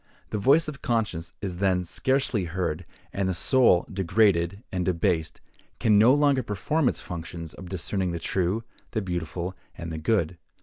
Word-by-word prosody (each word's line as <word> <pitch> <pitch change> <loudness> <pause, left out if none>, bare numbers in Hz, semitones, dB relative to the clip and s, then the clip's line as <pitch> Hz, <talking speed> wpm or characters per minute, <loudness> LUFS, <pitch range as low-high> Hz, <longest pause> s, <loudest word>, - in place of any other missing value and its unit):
The 105 - -1
voice 145 +10 +4
of 140 -3 -6
conscience 95 -8 -1
is 90 -3 -3
then 95 -1 +2
scarcely 130 +2 0
heard; 85 -1 -3 0.3
and 95 -1 0
the 95 - 0
soul, 115 -3 +4
degraded 95 0 +1
and 90 -1 -1
debased, 85 -2 0 0.4
can 105 -2 +4
no 115 +4 +7
longer 145 -1 +3
perform 125 +7 0
its - - -4
functions 85 -1 -7
of 90 -1 -10
discerning 95 +1 -1
the 85 - -2
true, 95 +6 -1 0.3
the 110 - 0
beautiful, 90 0 -4 0.2
and 85 -1 -6
the 80 - -4
good. 85 -2 0
95 Hz, 165 wpm, -26 LUFS, 85-110 Hz, 0.4 s, no